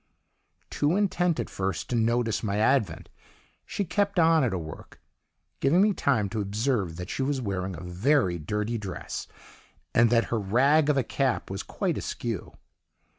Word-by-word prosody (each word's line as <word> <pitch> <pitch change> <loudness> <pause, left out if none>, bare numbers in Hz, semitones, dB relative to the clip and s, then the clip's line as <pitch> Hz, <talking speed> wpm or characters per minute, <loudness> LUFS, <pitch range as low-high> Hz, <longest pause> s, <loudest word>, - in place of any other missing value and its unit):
"Too 150 +4 +1
intent 180 -4 +1
at - - -2
first 95 0 -3
to - - +1
notice 115 -1 +1
my 100 -2 -1
advent, 105 -7 +1 0.6
she 200 - -2
kept 200 +2 0
on 165 -2 +5
at 120 - +1
her 95 - -1
work, 80 -2 -9 0.6
giving 145 +7 +3
me 205 +1 +4
time 120 - +1
to 110 0 -2
observe 100 -3 -1
that 90 +1 -6
she - - -3
was 135 0 0
wearing 95 -5 -3
a 80 - -8
very 90 - +1
dirty 105 +8 -2
dress, 95 -3 -6 0.7
and 120 0 +5
that 115 0 +2
her 115 - +1
'rag' 135 +10 +3
of 145 - +3
a 135 - +3
cap 130 -3 -1
was 95 - -3
quite - - -2
askew. 115 -6 -5
115 Hz, 170 wpm, -27 LUFS, 95-145 Hz, 0.7 s, on